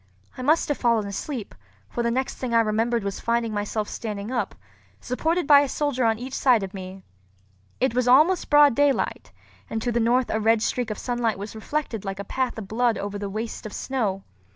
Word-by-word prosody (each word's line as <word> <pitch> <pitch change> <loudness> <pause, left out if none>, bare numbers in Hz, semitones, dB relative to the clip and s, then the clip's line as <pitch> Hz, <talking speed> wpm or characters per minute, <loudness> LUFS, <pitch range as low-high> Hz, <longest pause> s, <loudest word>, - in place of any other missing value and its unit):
I - - -7
must 305 +6 +3
have 290 - -1
fallen 235 -3 +2
asleep; 215 +4 -5 0.3
for 240 - -3
the 235 - +1
next 260 +3 -1
thing 245 -3 -2
I 230 - +6
remembered 225 +1 0
was 200 -1 -3
finding 235 -1 0
myself 205 +1 -2
standing 210 0 -5
up, 245 -2 -2 0.4
supported 320 +7 -1
by 285 0 +8
a 285 -1 +1
soldier 280 -4 0
on 225 -1 +2
each 255 +3 -7
side 245 -7 +3
of 195 +1 -6
me. 190 0 -8 0.8
It 260 -2 +1
was 250 0 +1
almost 310 +9 +5
broad 290 -2 +7
daylight, 285 +2 0 0.4
and 225 - -2
to 245 - 0
the 235 - +1
north 240 +2 +2
a 220 - 0
red 220 0 +3
streak 245 -2 -1
of 215 - -4
sunlight 240 -4 -1
was 205 +2 -7
reflected 225 -1 -3
like 195 -1 -4
a - - -3
path 255 +4 -2
of 210 -3 -6
blood 230 +2 +1
over 205 0 -4
the 200 -1 -4
waste 220 +2 -5
of 210 - -10
snow. 210 -8 -2
235 Hz, 210 wpm, -24 LUFS, 215-255 Hz, 0.8 s, by